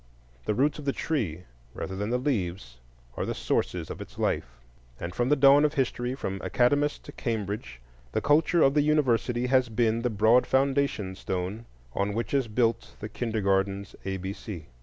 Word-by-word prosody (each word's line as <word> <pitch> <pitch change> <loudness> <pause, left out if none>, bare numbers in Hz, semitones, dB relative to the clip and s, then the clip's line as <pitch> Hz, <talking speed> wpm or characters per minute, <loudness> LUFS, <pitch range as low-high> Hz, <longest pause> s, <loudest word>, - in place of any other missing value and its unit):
The 105 - 0
roots 145 +6 +1
of 150 - -8
the 140 - +1
tree, 105 - -2 0.3
rather 95 - -4
than 105 +2 -2
the 125 - +1
leaves, 95 - -2 0.4
are - - -2
the - - -3
sources - - -1
of - - -7
its - - -10
life; 60 0 -1 0.4
and 85 +1 -5
from 120 +4 0
the 150 - +5
dawn 140 +1 +6
of 150 0 +2
history, 125 -2 -1
from 95 -7 -4
Academus 145 +4 +2
to - - -10
Cambridge, 105 - -4 0.3
the - - 0
culture 160 +3 +3
of 135 - +5
the 150 - +4
University 125 -5 +2
has 130 -1 +3
been 115 0 +1
the 125 - 0
broad 110 +3 +4
foundation 135 -7 +1
stone 95 +4 -4 0.3
on 100 +1 -1
which 115 +4 -3
is 135 -3 +2
built 115 +1 0
the 105 - -6
kindergarten's 100 -3 -1
A 95 0 -2
B 95 +1 -4
C. 95 -7 -8
115 Hz, 180 wpm, -27 LUFS, 100-135 Hz, 0.4 s, dawn